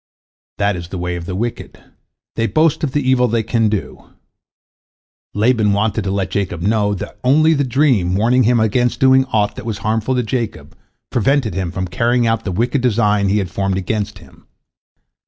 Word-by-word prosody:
That 100 -1 +1
is 85 -1 -7
the 95 - -6
way 90 0 -3
of 85 -1 -7
the 90 - -4
wicked, 115 +4 -4 0.6
they 115 0 0
boast 155 +2 +1
of 145 - 0
the 145 -3 -1
evil 125 -1 +3
they 115 -1 0
can 115 0 +1
do. 105 -2 -4 1.3
Laban 110 -1 +2
wanted 105 +1 0
to - - -1
let 95 -1 -2
Jacob 90 -4 -2
know 105 0 +1
that 95 - -8
only 155 +5 +4
the 140 -2 +1
dream 125 -9 +1
warning 120 +5 +3
him 120 0 +3
against 120 +3 +1
doing 130 0 +5
aught 105 -4 0
that - - -7
was 110 -3 -3
harmful 110 +4 0
to 125 - 0
Jacob 110 - -4 0.4
prevented 125 -2 +1
him 90 0 -2
from 95 0 -3
carrying 120 +6 +1
out 115 0 0
the 95 - -2
wicked 120 +8 0
design 105 -4 +2
he 100 - +2
had 95 -4 -2
formed 95 0 -1
against 100 +2 -3
him. - - -19
110 Hz, 190 wpm, -18 LUFS, 100-125 Hz, 1.3 s, doing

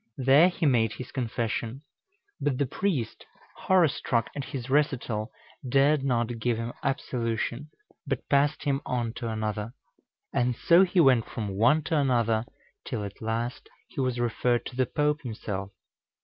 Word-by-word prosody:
There 135 +7 +6
he 175 - -2
made 115 -6 +3
his 125 - -8
confession; 120 +1 -3 0.6
but 145 -3 0
the 140 - +1
priest, 135 - -2 0.3
horror 185 -3 +4
struck 120 -5 -1
at 140 -2 -4
his 125 -3 -6
recital, 130 -6 0 0.4
dared 140 +2 +3
not 120 -3 0
give 120 0 0
him 115 +1 -4
absolution, 125 0 -2 0.4
but - - -3
passed 145 +1 +2
him 140 -1 0
on 120 -2 -2
to 115 -2 -3
another. 110 +1 -3 0.6
And 125 0 +1
so 170 +8 +5
he 185 0 +1
went 130 -7 +5
from 105 -3 -4
one 115 +11 +3
to 160 +1 0
another, 115 -4 +2 0.4
till 120 -8 -4
at 100 0 -8
last 115 +2 -3 0.2
he - - -4
was 130 -2 -1
referred 120 0 0
to 125 - -7
the 130 -1 +1
Pope 150 +1 0
himself. 100 -5 -5
125 Hz, 155 wpm, -27 LUFS, 115-140 Hz, 0.6 s, There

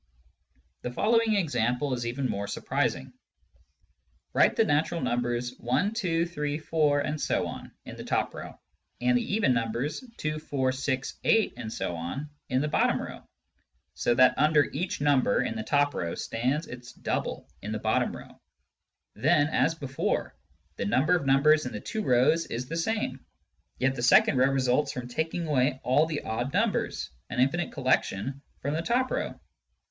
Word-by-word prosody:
The - - -3
following 225 - +2
example 140 - 0
is 120 -1 -2
even 130 +3 -1
more 100 -3 -3
surprising. 105 - -2 1.2
Write - - +4
the - - +4
natural 155 +3 +1
numbers 120 -2 -1
i, 125 +12 +1
2, 170 -7 0
3, 150 -3 -3
4,... 150 -2 +1
in 150 +2 -2
the - - -4
top - - -1
row, - - -9 0.4
and 125 0 +2
the 125 - 0
even 205 -12 +3
numbers 125 - -2
2, 155 0 -2
4, 135 -4 -1
6, 130 0 -3
8,... 225 -1 +3
in - - -6 0.9
the 150 - 0
bottom - - +2
row, - - -7 0.7
so 120 - +1
that 130 +1 +6
under 150 0 +5
each 180 -2 -3
number 140 -7 +3
in 110 - -3
the 110 - -3
top 145 +4 +2
row 85 -1 -3
stands 130 +8 -1
its 125 -2 -10
double - - -3
in 105 - -5
the 110 - -1
bottom 110 +1 0
row. - - -14 0.7
Then, 145 +5 +3
as 160 +2 +2
before, 135 -4 -2 0.4
the - - -2
number 150 - +3
of 160 -6 -2
numbers 150 +3 +4
in - - -6
the - - -4
two 220 - -4
rows 130 - +3
is 125 +2 -4
the 165 - -4
same, 165 -7 -2 0.5
yet 130 +1 +1
the 120 - -5
second 125 +1 +5
row 130 +1 +4
results 135 +1 +1
from 125 -1 -5
taking 160 +6 -2
away 130 -3 +1
all 145 +5 +3
the 155 -2 -3
odd 120 +4 -2
numbers - - 0
— - - -47
^an 125 - -4
infinite 160 +7 +1
collection 130 -1 0
— - - -38
from 140 +2 -1
the 160 - 0
top 245 +7 +1
row. - - -3
140 Hz, 165 wpm, -28 LUFS, 125-160 Hz, 1.2 s, that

